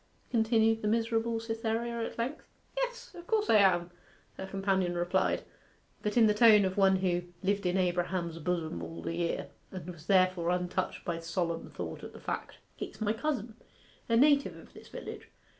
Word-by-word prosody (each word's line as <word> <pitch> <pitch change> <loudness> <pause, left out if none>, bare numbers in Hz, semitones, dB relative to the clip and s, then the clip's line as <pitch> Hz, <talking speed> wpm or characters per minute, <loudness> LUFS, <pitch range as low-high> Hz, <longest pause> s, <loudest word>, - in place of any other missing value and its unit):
continued 225 -1 +3
the 210 - -1
miserable 225 +1 +1
Cytherea 230 +1 -2
at - - -5
length. 245 +6 -3 0.3
'Yes, - - -3
of 345 0 -11
course 430 -1 +2
I 220 - +7
am,' 180 -3 +4 0.4
her 190 - -6
companion 190 -2 0
replied, 175 +1 +1 0.6
but 210 +3 -1
in 230 - +7
the 210 - +4
tone 210 -2 +7
of 190 0 -1
one 195 -1 +5
who 180 -2 +1 0.2
'lived 200 0 +1
in 180 +1 +1
Abraham's 175 -2 0
bosom 165 - -2
all 80 0 -7
the - - -2
year,' 170 -1 -1 0.2
and 180 -2 -7
was 170 -2 -14
therefore 185 -3 +3
untouched 180 +1 -1
by 170 -1 -2
solemn 165 0 -2
thought - - -6
at - - -8
the - - -11
fact. - - -4 0.2
'He's - - -7
my 215 -1 +1
cousin 235 -3 -2 0.6
a 230 - +4
native 285 +2 +4
of - - -15
this - - -13
village. - - -8
195 Hz, 175 wpm, -31 LUFS, 175-230 Hz, 0.6 s, I